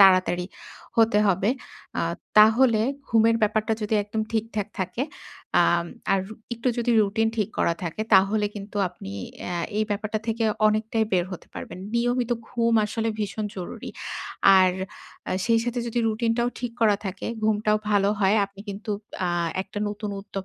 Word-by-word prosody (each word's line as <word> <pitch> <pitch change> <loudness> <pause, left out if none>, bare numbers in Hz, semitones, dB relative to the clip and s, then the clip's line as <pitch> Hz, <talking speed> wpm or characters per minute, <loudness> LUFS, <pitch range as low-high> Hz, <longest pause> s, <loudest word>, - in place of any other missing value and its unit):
তাড়াতাড়ি 185 -2 +5 0.5
হতে 225 -2 +5
হবে। 190 +1 +2 0.5
আ - - 0 0.4
তাহলে 220 +1 +6 0.3
ঘুমের 230 0 +4
ব্যাপারটা 215 +1 +2
যদি 210 +1 0
একদম 215 +2 -2
ঠিকঠাক 215 -2 -1
থাকে 225 +7 -2 0.6
আম 170 0 +3 0.3
আর 195 - +3 0.3
একটু 235 +2 -1
যদি 240 0 +1
routine 220 +2 +1
ঠিক 210 -2 +1
করা 170 - +2
থাকে 170 +6 -3
তাহলে 200 +3 +4
কিন্তু 205 0 -8
আপনি 100 - -9 0.4
আ - - -2 0.3
এই 215 - +3
ব্যাপারটা 215 +1 -1
থেকে 225 0 0 0.2
অনেকটাই 220 +1 +1
বের 175 -2 +3
হতে 180 - -8
পারবেন। - - -7 0.2
নিয়মিত 245 +1 +1 0.2
ঘুম 230 -1 +1
আসলে 225 +1 -2
ভীষণ 210 +1 -2
জরুরি। 180 - -6 0.7
আর 185 -1 +5 0.6
আ - - +1
সেই 230 -1 +4
সাথে 240 0 -1
যদি 235 +1 -2
routine 225 +1 0
টাও 240 0 +2
ঠিক 245 -2 -3
করা 210 -3 +5
থাকে, 190 0 -5 0.2
ঘুমটাও 215 0 +2
ভালো 200 -1 +3
হয়। 195 +2 +4
আপনি 195 0 -15
কিন্তু 205 +2 -5 0.4
আ - - 0 0.3
একটা 205 - -7
নতুন 210 0 -4
উদ্যোগ 195 -1 -6
215 Hz, 160 wpm, -25 LUFS, 195-225 Hz, 0.7 s, তাহলে